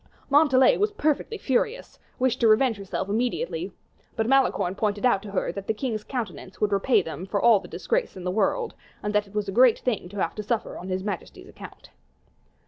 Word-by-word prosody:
Montalais, 275 -3 +5
who - - -3
was 420 +1 +1
perfectly 310 +6 -1
furious, 385 - -1 0.2
wished 255 -2 +1
to 230 - +4
revenge 225 +1 +4
herself 195 -1 -4
immediately, 245 - -2 0.4
but 225 - 0
Malicorne 260 -8 +2
pointed 205 +2 -1
out 240 -6 +3
to 210 - -9
her 195 - -1
that 200 -1 -7
the 220 - 0
king's 220 -2 -3
countenance 205 -6 -6
would 210 -1 +1
repay 200 +6 +3
them 175 +3 -7
for 200 +1 -1
all 225 -1 +5
the - - -12
disgraces 485 - -2
in 185 - -8
the 180 - -1
world, 450 - 0 0.3
and 210 0 -2
that 210 0 +1
it 200 - -17
was 210 -1 -1
a - - -2
great 245 +3 +5
thing 220 -8 -2
to 205 - -10
have 170 - 0
to 210 - -5
suffer 215 +2 -2
on 185 - -7
his 185 0 -2
majesty's 200 -4 -6
account. - - -13
215 Hz, 215 wpm, -25 LUFS, 200-260 Hz, 0.4 s, Montalais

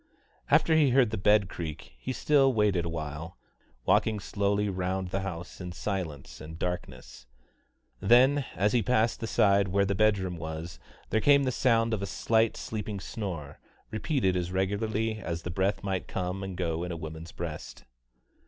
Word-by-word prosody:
After 160 - +4
he 150 -3 +5
heard 125 -3 +4
the - - -1
bed 105 0 +4
creak 80 -9 -7
he 130 - -4
still 135 +2 +3
waited 105 -7 +2
awhile, 80 +1 -5 0.5
walking 110 -1 +3
slowly 100 +1 0
round 95 -1 -2
the 95 - -1
house 90 -2 -6
in 90 -1 -5
silence 85 -8 -4
and 80 +1 -8
darkness. 90 -8 -5 0.7
Then, 130 - +5
as 105 +2 +2
he 120 - +4
passed 115 +1 +1
the 115 - -3
side 100 -2 +3
where 100 +2 +2
the 100 - 0
bedroom 95 -3 +1
was, 80 +1 -6 0.3
there 110 - +2
came 140 +2 +5
the 130 - +1
sound 115 -2 +2
of 105 - -1
a 100 - -2
slight 115 +2 +1
sleeping 105 -2 -4
snore, 90 -10 -6 0.3
repeated 110 - 0
as 90 0 -2
regularly 110 +3 -1
as 85 -4 -4
the 90 - -4
breath 95 +3 0
might 95 -2 -2
come 90 +1 -3
and 95 -2 -5
go 85 -2 -1
in 90 - -4
a 85 - -4
woman's 80 +1 -7
breast. 80 -3 -7
95 Hz, 170 wpm, -29 LUFS, 85-110 Hz, 0.7 s, he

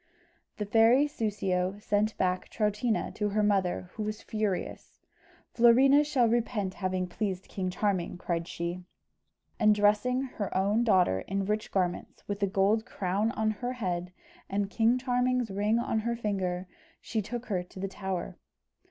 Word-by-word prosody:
The 210 - -2
fairy 225 +6 +5
Soussio 200 -7 -1
sent 210 +1 0
back 185 0 0
Troutina 215 +2 0
to 210 -1 -1
her 210 +1 +1
mother, 185 -3 0
who 220 - -6
was 215 0 -4
furious. 210 -4 -3 0.6
"Florina 265 +5 +6
shall 270 -5 +2
repent 225 -4 0
having 185 -1 -2
pleased 190 0 -3
King 185 -2 -3
Charming!" 185 -2 -1
cried 170 -2 -2
she; 170 +1 -4 0.8
and 215 -2 +5
dressing 210 +5 +2
her 215 -8 -4
own 205 +5 +2
daughter 185 - +3
in 195 0 -1
rich 210 +2 -2
garments, 180 -2 -2
with 205 0 -4
a 200 - +3
gold 200 +3 +2
crown 205 -2 -1
on 220 -3 +1
her 245 +4 -4
head, 180 -6 -3 0.4
and 200 0 -1
King 230 +2 +3
Charming's 250 -2 0
ring 205 +3 +1
on 230 -1 0
her 235 +2 -1
finger, 190 -5 -2 0.3
she 220 - -2
took 240 +4 -5
her 190 -5 -1
to 180 +1 -12
the 195 - -2
tower. 190 -2 -5
205 Hz, 155 wpm, -29 LUFS, 185-225 Hz, 0.8 s, Florina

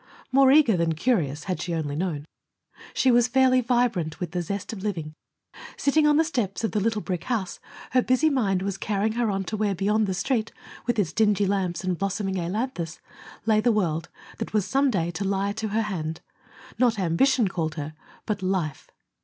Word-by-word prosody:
More 270 0 +6
eager 280 -7 +6
than 165 -1 +1
curious, 160 - 0
had 185 -1 -3
she 175 -2 -2
only 145 -3 -2
known. 155 -3 -2 0.7
She 260 - +4
was 240 0 +4
fairly 255 0 +4
vibrant 230 -10 0
with 175 -3 -4
the 180 0 -1
zest 200 +5 -4
of 200 - -7
living. 165 -7 -3 0.6
Sitting 300 +2 +3
on 295 0 +4
the 320 - +5
steps 240 - -2
of 225 - 0
the 215 - 0
little 215 0 0
brick 180 -3 -3
house, 220 -8 -2 0.3
her 255 - +4
busy 255 +5 +2
mind 205 -10 +1
was 195 -1 -3
carrying 210 +1 0
her 235 -1 0
on 195 -1 -1
to 205 +4 -4
where, 205 -2 0
beyond 210 +4 +1
the 190 - -1
Street, 230 +1 -1 0.4
with 240 -1 +1
its 175 -6 0
dingy 210 -2 +3
lamps 190 -3 -1
and 185 -2 -1
blossoming 195 -1 -1
ailanthus, 175 -2 -3 0.5
lay 215 -1 +3
the 240 +2 +3
world 175 -6 0 0.3
that - - -4
was 210 -3 +2
some 275 +1 +2
day 175 -7 0
to 185 +4 -4
lie 195 +1 0
to 220 +1 -3
her 220 +2 0
hand. 165 -6 -4 0.6
Not 240 -3 +3
ambition 200 +7 +3
called 160 -4 -2
her, 155 0 -5 0.3
but 210 -2 -2
life. 185 -6 -2
200 Hz, 195 wpm, -25 LUFS, 175-235 Hz, 0.7 s, More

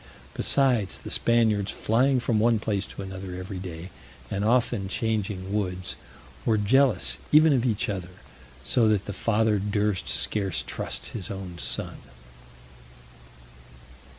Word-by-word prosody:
Besides, 125 -8 +2
the - - -6
Spaniards 110 -4 +2
flying 130 +4 +2
from 120 -3 0
one 115 +1 +3
place 105 -2 -2
to - - -8
another 95 -1 -7
every 90 +1 -6
day, 90 -1 -8 0.4
and 100 0 -1
often 115 -3 +1
changing 100 -2 -2
woods, 90 -3 -2 0.5
were 110 -2 +2
jealous 110 -1 +3
even 155 0 +6
of 125 -2 +1
each 110 -5 0
other, 95 -4 -4 0.5
so 110 - +2
that 105 -2 +2
the 100 - -5
father 110 +1 +1
durst 105 -1 -1
scarce 100 -5 0
trust - - -5
his 100 -6 -6
own 95 -3 -7
son. - - -4
105 Hz, 130 wpm, -26 LUFS, 95-115 Hz, 0.5 s, even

